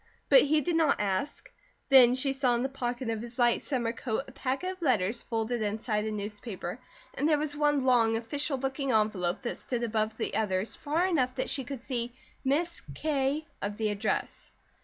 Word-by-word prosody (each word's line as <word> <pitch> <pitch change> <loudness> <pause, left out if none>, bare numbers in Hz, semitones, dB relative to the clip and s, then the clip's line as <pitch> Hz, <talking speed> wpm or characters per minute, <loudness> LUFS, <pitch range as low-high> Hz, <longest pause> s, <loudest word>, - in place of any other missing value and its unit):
But - - +8
he 300 +1 +3
did 345 +2 -1
not 325 -1 +3
ask. 200 +7 -2 0.4
Then 250 -2 +8
she 270 +1 +1
saw 260 -3 +2
in 235 - 0
the 265 - -1
pocket 245 -2 -3
of 220 -1 -3
his 235 0 -9
light 240 -1 +3
summer 240 -5 -1
coat 235 +1 -2
a - - -10
packet 275 +7 -2
of 370 -1 -11
letters 235 - +1
folded 225 +1 -2
inside 215 0 -1
a 220 - -2
newspaper, 210 -1 -5 0.3
and 295 +3 0
there 305 - +4
was 295 0 -2
one 295 -2 +2
long, 230 -3 +4
official 280 +5 -2
looking 270 +1 -2
envelope 210 -4 +1
that 240 - -3
stood 240 -2 -3
above 220 -1 -1
the - - -2
others 205 -1 0
far 315 +4 0
enough 260 -9 +1
that 260 - -1
she 270 - -1
could 255 -1 -7
see 240 -2 -3 0.3
"Miss 325 +6 +1
K 290 0 0
" - - -39
of 205 0 -3
the 220 -1 0
address. 205 +1 -2
250 Hz, 200 wpm, -29 LUFS, 220-280 Hz, 0.4 s, But